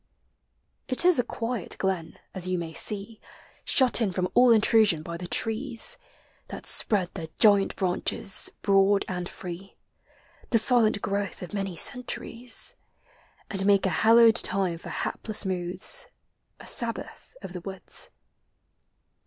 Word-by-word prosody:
It 255 +6 +4
is 360 -6 +4
a - - +3
quiet 230 -3 -4
glen, 185 -4 -3 0.2
as 185 -1 -2
you 185 0 -1
may 165 -2 -6
see, 210 +5 -3 0.4
Shut 255 -2 +3
in 210 -4 +1
from 180 0 -2
all 245 -1 +5
intrusion 215 -6 +3
by 170 +1 -7
the 175 +1 -7
trees, 230 +5 -3 0.5
That - - -9
spread 190 -5 +1
their 165 -4 -6
giant 205 -2 +4
branches, 190 +1 -1
broad 195 0 +3
and 180 -1 -4
free, 185 +2 -9 0.7
The 235 - +3
silent 220 -2 +2
growth 200 -1 -3
of 180 - -9
many 195 -3 -3
centuries; 245 - -1 0.7
And 195 -2 0
make 200 -1 +3
a - - +2
hallowed 230 0 +6
time 185 -5 +1
for - - -10
hapless 215 -2 -3
moods, 185 - +1 0.5
A - - -12
sabbath - - -1
of 175 - -8
the 180 - -7
woods. 190 +1 -1
200 Hz, 135 wpm, -26 LUFS, 185-230 Hz, 0.7 s, hallowed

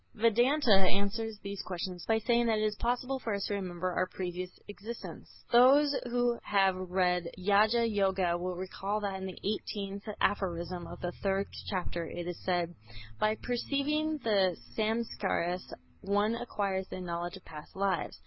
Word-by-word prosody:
Vedanta 240 +4 +3
answers 200 +3 +2
these 200 -1 -4
questions 180 -1 -5
by 225 - +4
saying 235 +1 +2
that 220 -1 +3
it 215 - +1
is 210 -1 +1
possible 250 +3 -1
for 225 -4 -2
us 200 - -2
to - - -2
remember 185 -2 -2
our 185 +1 +1
previous 180 -1 -4 0.2
existences. 215 +3 -8 0.2
Those 275 +4 +7
who 245 -1 +1
have 195 -2 +3
read 180 -1 +1 0.2
"Raja 215 +3 +5
Yoga" 190 -4 +2
will 180 +1 -3
recall 190 +3 -3
that 195 -2 -3
in 190 - -3
the 185 - -7
18th 200 0 -3
aphorism 175 -3 -1
of - - -9
the 175 - -2
third 195 0 0 0.2
chapter 175 -3 -2
it 175 +1 -5
is 175 - -6
said: 175 -2 0 0.5
"By 215 +7 +3
perceiving 290 +5 0
the 195 -6 +3 0.2
Samskâras 215 -5 -1 0.3
one 205 +3 +2
acquires 200 -5 -2
the - - -6
knowledge 175 -1 -4
of - - -17
past 150 -1 -10
lives." 195 0 0
200 Hz, 160 wpm, -31 LUFS, 185-225 Hz, 0.5 s, Those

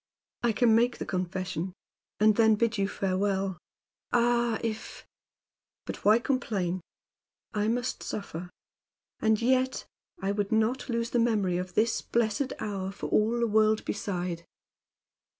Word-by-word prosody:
I 240 -1 +3
can 225 +1 +4
make 235 +2 +3
the - - -4
confession, 185 -1 -3 0.5
and 215 0 +5
then 220 -1 +5
bid 230 0 0
you 195 - +2
farewell. 195 -1 -1 0.5
Ah! 240 -1 +2
if 225 -1 -5 0.8
But - - -6
why 215 +2 +6
complain? 200 -8 -1 0.7
I 210 0 0
must 245 +3 -1
suffer. 180 -3 -5 0.7
And 220 -1 +3
yet 260 +2 +1 0.3
I 195 +1 -1
would 205 -1 -1
not 220 +5 +1
lose 235 0 -1
the 240 - +2
memory 210 -6 +2
of 180 0 -5
this 225 +1 +2
blessed 235 +3 0
hour 195 -2 -3
for 195 - -6
all 225 +3 +3
the 235 - +3
world 215 0 +3
beside! 180 -4 -3
215 Hz, 135 wpm, -28 LUFS, 195-235 Hz, 0.8 s, why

